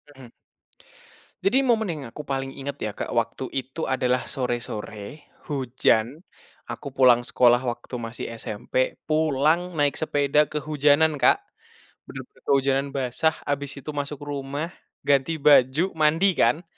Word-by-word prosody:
Mhm. 130 -2 -12 1.1
Jadi 255 +8 +3
momen 225 -4 +2
yang 150 -4 -4
aku 150 - -7
paling 135 -1 -2
inget 140 0 -6
ya 110 - -2
Kak - - -5
waktu - - -2
itu 135 +5 -3
adalah 125 -1 0
sore-sore 120 0 -5 0.2
hujan, 130 0 +1 0.5
aku 145 - -6
pulang 125 -2 +5
sekolah 120 0 +4
waktu 120 +1 -4
masih 115 0 -6
SMP 115 +4 -2
pulang 155 +3 +2
naik 145 -2 +1
sepeda 145 -1 +2
kehujanan 150 +1 +2
Kak, 125 - +4 0.7
bener-bener - - -11
kehujanan 135 0 +2
basah 135 +5 0
habis 140 -1 -2
itu 150 +3 -6
masuk 145 0 -4
rumah, 145 +3 -4 0.3
ganti 145 +3 +2
baju 145 +5 +4
mandi 160 +5 +3
kan, 150 +3 +2
140 Hz, 130 wpm, -24 LUFS, 130-155 Hz, 1.1 s, pulang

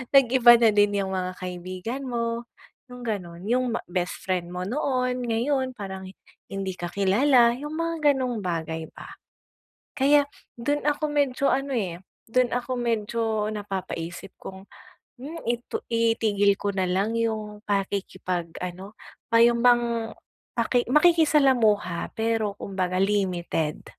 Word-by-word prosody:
nag-iba 250 -2 +7
na 230 -1 +5
din 205 0 +3
yung 190 - -4
mga 185 -1 -2
kaibigan 185 +8 -5
mo 235 -1 -2 0.4
yung 250 -1 -11
ganun, 180 -6 -4
yung 245 0 +1
ma - - -2
bestfriend 180 0 -2
mo 180 0 -4
noon, 255 0 -1
ngayon 260 +3 0
parang 190 -3 -7 0.4
hindi 195 -1 -3
ka 175 - -4
kilala 235 +5 +4
yung 295 +3 -6
mga 330 -3 +2
ganung 255 -4 -2
bagay 160 -2 -3
ba. - - -10 0.9
Kaya 285 +1 +5 0.3
dun 290 +5 -1
ako 295 +1 +1
medyo 280 -2 +1
ano 275 +1 -1
eh, 180 -7 -2 0.3
dun 250 +2 +2
ako 250 +1 -2
medyo 225 -2 -1
napapaisip 190 -3 -5
kung, 190 0 -9 0.5
hmm, 300 +6 -8
itu 240 0 -2
itigil 225 -3 +2
ko 205 - -1
na 190 -1 0
lang 200 +5 0
yung 215 -2 -2
pakikipag 185 -3 -2
ano 185 +3 -7 0.4
pa 230 - +5
yun 235 0 +5
bang 235 -2 +3 0.5
maki 240 +1 +2
makikisalamuha 270 - +3
pero 225 -2 0
kumbaga 185 -2 -2
limited. 180 -6 -1
225 Hz, 130 wpm, -25 LUFS, 190-250 Hz, 0.9 s, nag-iba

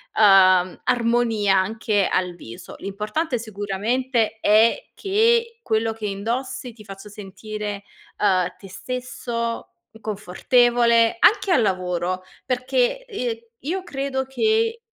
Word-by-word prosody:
uhm, 185 -3 +5
armonia 230 -5 +2
anche 205 +1 0
al 180 -1 0
viso. 115 -9 -11
L'importante, 215 +9 -3
sicuramente, 220 +3 -1
è 225 - +3
che 460 +3 +1
quello 225 - 0
che 220 -1 -7
indossi 235 +5 -3
ti 220 -2 -16
faccio 195 +1 -10
sentire, 205 0 -7 0.4
uhm, 185 -3 +1
te 195 - -13
stesso, 235 +1 -5 0.3
confortevole. 230 +3 +2
Anche 395 - +4
al 270 - +4
lavoro, 185 -1 -1 0.2
perché, 255 - 0
ehm, 250 - -3 0.2
io 360 +7 -3
credo 270 -3 -3
che 445 +9 +1
225 Hz, 110 wpm, -22 LUFS, 200-255 Hz, 0.4 s, uhm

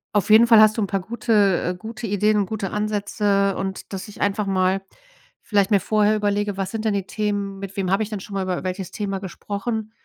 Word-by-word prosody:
Auf 205 0 +1
jeden 225 +2 +7
Fall 225 -2 +8
hast 215 +1 +5
du 220 - +1
'n 200 - 0
paar 195 -2 -1
gute, 225 +3 -2 0.3
äh 180 +1 -2
gute 225 +4 -7
Ideen 210 +2 +2
und 200 - +2
gute 200 -1 -4
Ansätze. 205 -1 0
Und, 190 +1 -5
dass 195 +2 -5
ich 210 - -11
einfach 205 +1 0
mal 190 0 +1 0.6
vielleicht 205 0 +1
mir 200 -3 +4
vorher 215 +1 +2
überlege, 205 -1 0
was 195 -1 -3
sind 225 -1 -4
denn 215 - +2
die 195 -2 -2
Themen, 205 -2 -3
mit 195 0 -7
wem 190 -2 -1
habe 195 - +2
ich 220 - -2
denn 210 -3 -5
schon 200 - -10
mal 195 -1 -1
über 185 -1 -3
welches 185 0 -4
Thema 195 -2 -3
gesprochen 210 +3 -4
205 Hz, 235 wpm, -22 LUFS, 195-215 Hz, 0.6 s, Fall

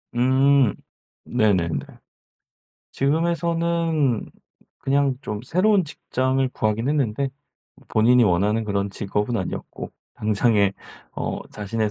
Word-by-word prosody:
음, 130 -1 +4 0.5
네네네. 100 -8 +1 1.1
지금에서는 165 -2 0 0.5
그냥 140 0 +1
좀 105 -5 -5
새로운 190 - +2
직장을 130 -2 -1
구하긴 110 0 -1
했는데 140 -3 0 0.6
본인이 120 +3 +4
원하는 105 +4 +2
그런 100 -1 -1
직업은 105 +4 -2
아니었고 95 - -5 0.2
당장에 105 -1 +2 0.4
어 - - -3
자신의 105 +1 -2
125 Hz, 230 characters per minute, -23 LUFS, 105-140 Hz, 1.1 s, 음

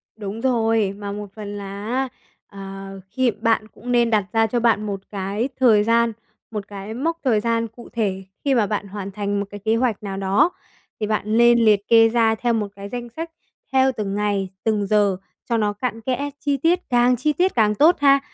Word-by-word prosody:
Đúng 210 +1 -6
rồi, 225 -5 +2
mà 205 -1 -5
một 205 0 -6
phần 210 -1 -7
là 200 +1 -7
á, 260 +3 0 0.4
ờ, 195 0 -9
khi 255 +3 +1
bạn 215 +1 0
cũng 245 +3 -8
nên 240 -1 +3
đặt 215 -3 +2
ra 225 0 +3
cho 240 +2 0
bạn 230 -2 +2
một 200 -2 -3
cái 200 +6 -2
thời 225 -5 +5
gian, 230 +1 +2 0.4
một 210 -3 -5
cái 200 +1 -7
mốc 325 +8 -1
thời 235 -5 +3
gian 230 +1 0
cụ 235 +2 -14
thể 195 -4 -1 0.2
khi 275 -2 +3
mà 220 -4 +3
bạn 205 -1 -2
hoàn 200 0 -6
thành 205 0 -2
một 200 - -2
cái 205 - -8
kế 220 +1 +3
hoạch 230 -3 0
nào 195 -1 -4
đó. 195 - +3 0.5
Thì 210 - -1
bạn 215 -1 -1
lên 235 0 +6
liệt 205 -2 +3
kê 225 -1 +6
ra 225 -1 +3
theo 240 +1 0
một 215 -2 0
cái 200 0 -8
danh 240 0 -5
sách, 325 +7 -6 0.4
theo 265 0 +4
từng 200 -2 -2
ngày, 205 -2 0
từng 210 -3 0
giờ 205 -2 +3 0.3
cho 235 - +2
nó 210 -2 +1
cặn 225 +1 -4
kẽ, 260 +4 -2
chi 285 -1 0
tiết, 330 +6 +2
càng 245 0 +4
chi 295 +5 0
tiết 360 +6 +1
càng 210 -3 +3
tốt 315 - +5
ha. 275 -1 +5
220 Hz, 215 wpm, -22 LUFS, 205-240 Hz, 0.5 s, lên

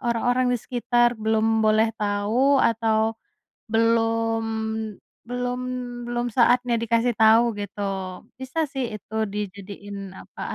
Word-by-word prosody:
orang-orang 245 +2 +1
di - - +2
sekitar 240 -1 +2
belum 220 0 +2
boleh 220 +1 +3
tahu, 210 +7 +2
atau 225 -1 +2 0.6
belum 225 0 +2 0.9
belum 245 0 -2 0.5
belum 240 0 -2
saatnya 245 0 +4
dikasih 230 +1 +1
tahu, 225 0 +5
gitu. 205 0 -6 0.6
Bisa 260 +4 -5
sih 265 -2 -2
itu 215 +1 -9 0.2
dijadiin, 200 -1 -7
apa, - - -12
225 Hz, 110 wpm, -24 LUFS, 215-240 Hz, 0.9 s, tahu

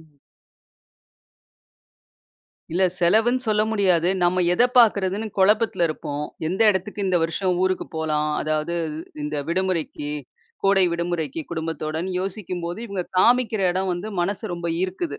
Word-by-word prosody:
ம். 160 - -19 2.7
இல்ல, 185 - +1 0.2
செலவுன்னு 220 +8 +4
சொல்ல 210 0 +3
முடியாது. 185 -5 +2
நம்ம, 180 +1 +2
எதை 245 - +5
பாக்கறதுன்னு 205 -2 +3
குழப்பத்துல 205 -2 +3
இருப்போம். 150 -1 -4 0.2
எந்த, 190 +5 -3
இடத்துக்கு 205 +2 -3
இந்த 185 -1 +2
வருஷம் 180 +3 0
ஊருக்கு 185 0 0
போலாம். 150 -1 0
அதாவது, 155 +2 -1 0.5
இந்த 150 0 -3
விடுமுறைக்கு, 170 -5 -1 0.5
கோடை 195 -1 +5
விடுமுறைக்கு 170 -3 -2
குடும்பத்தோடன்னு 160 +1 -3
யோசிக்கும்போது 180 -2 -4
இவங்க 200 -3 -3 0.2
காமிக்கிற 230 -1 +3
இடம் 190 +1 -1
வந்து 180 +5 -4
மனசு 185 0 -2
ரொம்ப 170 0 -5 0.2
ஈர்க்குது. 190 - -3
185 Hz, 120 wpm, -23 LUFS, 165-200 Hz, 2.7 s, எதை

